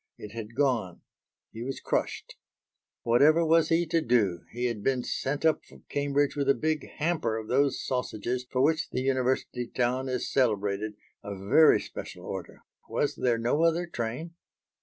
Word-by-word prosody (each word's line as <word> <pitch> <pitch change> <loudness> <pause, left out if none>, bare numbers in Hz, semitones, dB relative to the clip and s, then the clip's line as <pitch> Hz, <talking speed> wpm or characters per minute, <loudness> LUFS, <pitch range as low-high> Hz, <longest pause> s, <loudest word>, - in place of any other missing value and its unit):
It 105 - -9
had 115 0 -7
gone. 120 -10 0 0.5
He 115 - -8
was 135 +2 -4
crushed. - - -2 0.7
"Whatever 150 +8 +5
was 165 0 +4
he 165 +1 +3
to 165 0 +1
do? 110 - +1
He 120 +1 -3
had 115 -4 -2
been 130 +1 +1
sent 140 +3 -2
up 160 - +3
from - - -18
Cambridge 145 0 +1
with 140 -1 0
a 140 - +5
big 155 -1 -1
hamper 150 -9 0
of 110 -1 -6
those 135 +2 +1
sausages 125 0 -2
for 130 - +1
which 155 +3 +2
the - - -2
University 130 -2 0
town 125 +2 -1
is 125 -1 -2
celebrated 105 -4 +1 0.3
a 100 -1 -5
very 100 +12 +5
special - - -8
order. - - -7 0.3
Was - - 0
there 120 -2 +1
no 120 +7 +1
other 165 +1 +3
train?" 145 +2 -4
130 Hz, 165 wpm, -28 LUFS, 115-145 Hz, 0.7 s, Whatever